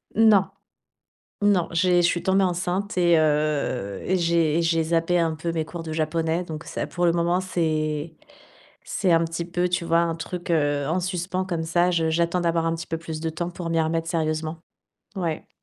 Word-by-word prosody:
Non, 215 -3 +5 0.9
non, 200 -4 +3
j'ai 175 +1 +3
je 175 - +4
suis 175 -1 0
tombée 190 +1 +2
enceinte 185 +2 -1
et 170 -2 +4
heu, 150 -9 0
et 185 - +1
j'ai 170 -2 +2
et 170 - +2
j'ai 165 -1 +2
zappé 165 +2 +1
un 165 -2 +1
peu 165 +2 -3
mes 160 - 0
cours 165 +1 -7
de 160 -1 -5
japonais. 160 +2 0
Donc 160 -2 -7
ça, - - -3
pour 175 0 -1
le 170 - +4
moment, 175 +1 +1
c'est 155 -3 -2 0.7
c'est 185 -3 0
un 165 0 +4
petit 165 +1 -3
peu, 175 +1 -1
tu 175 -1 -1
vois, 165 0 +3
un 165 -1 0
truc, 175 +1 -6
heu, 145 -3 +1
en 175 +4 0
suspens 180 +1 -2
comme 170 -3 -2
ça. 175 +2 +2
Je, 165 -2 +1
j'attends 170 +2 +1
d'avoir 170 -1 +1
un 165 - +1
petit 165 0 -7
peu 165 - -2
plus 160 -1 -6
de 160 +1 -2
temps 170 +2 -4
pour 175 -1 -5
m'y 165 0 +1
remettre 165 +1 0
sérieusement. 160 0 -1 0.6
Oui. 170 -4 -3
170 Hz, 205 wpm, -24 LUFS, 160-175 Hz, 0.9 s, Non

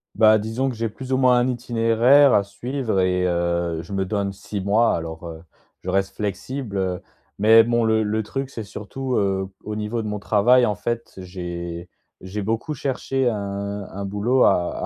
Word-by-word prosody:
Bah, 110 0 +6
disons 115 +5 -2
que 125 - -5
j'ai 115 0 -2
plus 130 +5 -9
ou 130 - +3
moins 125 -2 +4
un 120 - +2
itinéraire 120 +3 +4
à 100 - +4
suivre 115 +1 -3
et 90 0 +1
heu, 85 -1 0
je 90 +4 -9
me 95 -1 0
donne 100 0 -1
6 100 +1 -6
mois 105 +4 +3
alors, 80 0 -6
heu, 80 -1 -8 0.4
je 95 - -5
reste 95 +1 0
flexible, 105 +2 -4
heu. 95 -1 -1 0.4
Mais 110 +2 +7
bon 120 0 +1
le 110 0 +2
le 110 +1 0
truc 135 +5 -5
c'est 115 - -6
surtout, 120 +6 -5
heu, 95 -1 0
au 105 - -5
niveau 110 +2 -3
de - - -4
mon 105 0 -3
travail, 120 +5 +4
en 105 - 0
fait, 115 +3 -4
j'ai 85 -2 -6 0.3
j'ai 95 +2 -5
beaucoup 115 +8 -2
cherché 135 -1 -1
un 100 -2 -3
un 100 +1 -6
boulot 105 +6 +1
à 85 0 +1
105 Hz, 190 wpm, -22 LUFS, 95-120 Hz, 0.4 s, Mais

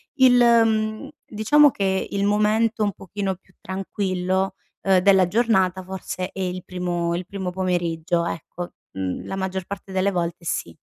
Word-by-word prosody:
Il, 260 -2 +6
mhmm, 225 +1 +3 0.2
diciamo 290 +8 +5
che 190 -3 -1
il 200 0 0
momento 215 +2 +2
un 205 - +1
pochino 195 0 -4
più 185 0 -28
tranquillo, 190 0 -2 0.3
uhm, 190 -1 +4
della 190 -1 +5
giornata 190 -3 +2
forse 185 0 -5
è - - -9
il 180 -1 -3
primo 175 -2 -2
il 180 +1 -4
primo 190 -2 -4
pomeriggio, 175 -2 0
ecco; 175 +1 -6 0.2
mhmm, 95 -1 -3
la 195 - -4
maggior 190 -1 -3
parte 195 0 -8
delle 190 +1 +2
volte 170 -1 -2
sì. 85 - -3
190 Hz, 155 wpm, -23 LUFS, 180-210 Hz, 0.3 s, Il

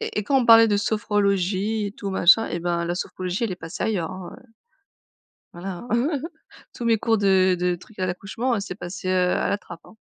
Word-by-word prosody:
Et - - -4
et 210 - -1
quand 275 +3 +3
on 240 - -1
parlait 225 0 +8
de 205 -1 +2
sophrologie 205 0 0
et 200 - -6
tout 200 - -6
machin, 190 +4 +5
eh 170 - -3
ben, 170 0 -1
la 175 - -1
sophrologie, 185 +3 -3
elle 215 - -2
est - - -6
passée 165 +2 -7
ailleurs, 180 -7 -1
hein, 185 -1 -8
heu - - -22 1.1
voilà. 180 +4 -7
Hein. 265 +5 0 0.5
Tous 240 - -6
mes 230 -1 +3
cours 225 +1 +1
de 190 -2 +3
de 180 0 0
trucs 205 +4 -18
à 185 - +1
l'accouchement, 210 +7 -2
c'est 200 -2 -6
passé, 180 +1 -7
heu, 180 -1 +2
à - - 0
la - - +1
trappe, 175 -4 -12
hein. - - -16
195 Hz, 220 wpm, -23 LUFS, 180-220 Hz, 1.1 s, parlait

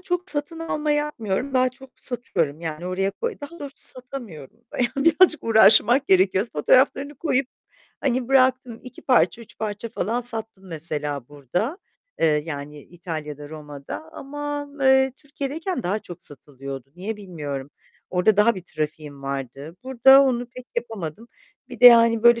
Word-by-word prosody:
çok 360 0 -3
satın 300 +2 -4
alma 305 -2 -2
yapmıyorum. 275 -4 -1
Daha 255 0 +4
çok 265 +1 -15
satıyorum; 165 - -2
yani, 165 +1 -5
oraya 190 +2 0
koy 465 - -4
daha 290 +4 -9
doğrusu 280 -1 -8
satamıyorum. 235 - -8 0.2
Yani, 245 - +3 0.2
birazcık 330 0 +5
uğraşmak 230 +4 +5
gerekiyor. 190 +2 +4
Fotoğraflarını 270 - +3
koyup 275 -2 0 0.5
hani 255 -2 0
bıraktım. 255 -3 +2
2 255 -1 -11
parça, 245 -3 +3
3 230 - -18
parça 215 +1 -4
falan 225 +3 -2
sattım 225 -4 -4
mesela 150 -5 -4
burada, 160 - -3 0.4
eee, - - +4 0.2
yani, 150 -1 -6
İtalya'da, 155 -3 -7
Roma'da 150 - -8
ama, 290 0 -5
eee, 265 0 +4
Türkiye'deyken 290 +2 -4
daha 190 +4 0
çok 175 -5 -11
satılıyordu. 135 -1 -9
Niye 205 +5 -4
bilmiyorum. 145 -9 -6 0.4
Orada 185 +3 +3
daha 210 +3 +5
bir 185 - -7
trafiğim 150 -3 -5
vardı. 140 +3 -5
Burada 265 +1 +7
onu 245 -3 0
pek 250 +1 -12
yapamadım. 225 -3 -5 0.4
Bir - - -10
de, 245 - +10
yani, 230 -2 +7
böyle 235 0 +6
225 Hz, 145 wpm, -23 LUFS, 160-265 Hz, 0.5 s, de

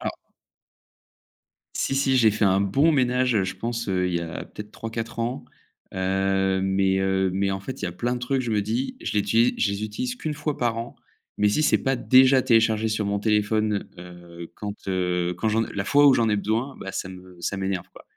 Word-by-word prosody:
Ah. - - -2 1.6
Si, 135 - -1
si 135 -1 +2
j'ai 110 -3 +5
fait 105 +1 -1
un 95 0 +3
bon 135 +12 +3
ménage, 125 -3 +2
heu, 100 - +2
je 95 - -5
pense, 115 -1 -4
heu, 90 -1 0
il 90 - -2
y - - +1
a 85 0 -6
peut-être 105 0 -10
3-4 115 +1 -6
ans, 120 +3 -3 0.5
heu, 95 0 0
mais, 95 0 +1
heu, 95 0 +1
mais 100 0 0
en 95 - -3
fait, 130 +6 -7
il - - -1
y - - -1
a - - -5
plein 120 +7 -2
de 125 - -4
trucs, 130 +2 -1
je 120 -3 -3
me 105 - +1
dis, 120 - -3
je - - -3
l'uti 115 +3 +2
je 105 - +1
les 100 +1 -4
utilise 125 +4 -3
qu'une 155 +2 -4
fois 150 0 -3
par 120 -2 0
an, 115 +1 -6 0.4
mais 105 - +3
si 130 +10 +1
c'est - - +4
pas 135 -1 +1
déjà 130 +1 +5
téléchargé 110 -2 +2
sur 110 -1 -1
mon 100 0 -1
téléphone, 105 0 0
heu, 85 -1 -11
quand, 105 -1 -5 0.2
heu 90 -1 0
quand, 110 - -1
heu 115 0 0
la 100 0 -3
fois 145 +6 +5
où 135 - +7
j'en 115 -3 +2
ai 105 - +2
besoin, 110 +7 -2
bah 95 - -7
ça 95 - -4
me 90 -1 -12
ça 95 - -2
m'énerve 95 -2 -3
quoi. - - -14
105 Hz, 225 wpm, -24 LUFS, 95-120 Hz, 1.6 s, où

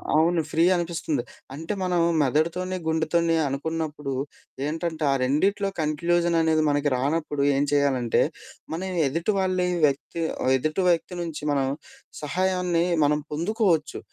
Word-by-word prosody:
అవును 165 +2 +3
ఫ్రీ 165 +2 +2
అనిపిస్తుంది. 165 -6 -2 0.3
అంటే 160 +8 -4
మనం 180 -1 +1 0.2
మెదడుతోనీ, 170 +7 0
గుండెతోనీ 160 +1 +1
అనుకున్నప్పుడు 150 0 -3 0.5
ఏంటంటే, 160 +1 -3
ఆ - - +3
రెండిట్లో 195 +9 +1
కంక్లూజననేది 160 0 +2
మనకి 145 0 +1
రానప్పుడు 145 +2 -1
ఏం 140 - +2
చేయాలంటే, 135 -5 +2 0.5
మనం 185 +3 -3 0.2
ఎదుటి 165 +9 -1
వాళ్లీ 185 -1 +1 0.2
వ్యక్తి 140 +4 -2 0.2
ఆహ్, 130 - +2
ఎదుటి 155 +7 -1
వ్యక్తి 175 +1 0
నుంచి 165 -3 -5
మనం 135 -2 +1 0.5
సహాయాన్ని 180 +2 0 0.2
మనం 150 +1 +2
పొందుకోవచ్చు. 170 -2 0
160 Hz, 120 wpm, -25 LUFS, 145-175 Hz, 0.5 s, అవును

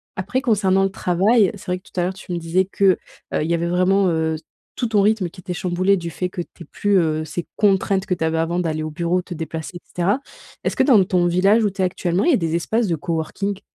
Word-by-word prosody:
Après 200 +8 -2
concernant 195 -6 +2
le 195 - +1
travail, 195 +4 +3
c'est 195 - -13
vrai 180 0 -1
que - - -35
tout - - -4
à - - +2
l'heure 180 +2 -1
tu 190 -1 -11
me - - -1
disais 170 +3 +1
que, 200 +1 -4 0.5
heu, - - +1
il 160 - -3
y - - +2
avait 170 0 0
vraiment, 185 +2 +3
heu, 160 -1 0 0.4
tout 245 - -1
ton 215 -2 +2
rythme 205 -3 +2
qui 180 - -15
était 180 0 -5
chamboulé 185 +2 +1
du 170 -2 -5
fait 180 +2 -3
que 180 - -4
tu 175 - -11
aies - - -15
plus, 205 +6 +1
heu, 155 -3 +1
ces 160 +2 -5
contraintes 195 -1 +2
que 190 - 0
tu 170 - -3
avais 160 0 0
avant 165 +2 0
d'aller 155 -3 -1
au 155 - -4
bureau, 170 +3 0
te 180 - -8
déplacer 160 +1 -6
et - - -11
cetera. 185 +8 0 0.5
Est-ce - - 0
que - - +3
dans 240 -8 +6
ton 180 -1 +2
village 195 +6 +3
où 210 - +3
tu 195 - -4
es - - +4
actuellement 180 - 0
il 345 - +4
y - - +4
a - - +4
des 165 -2 -1
espaces 220 +6 0
de 170 - +1
coworking? 170 +5 -3
180 Hz, 270 wpm, -21 LUFS, 170-195 Hz, 0.5 s, dans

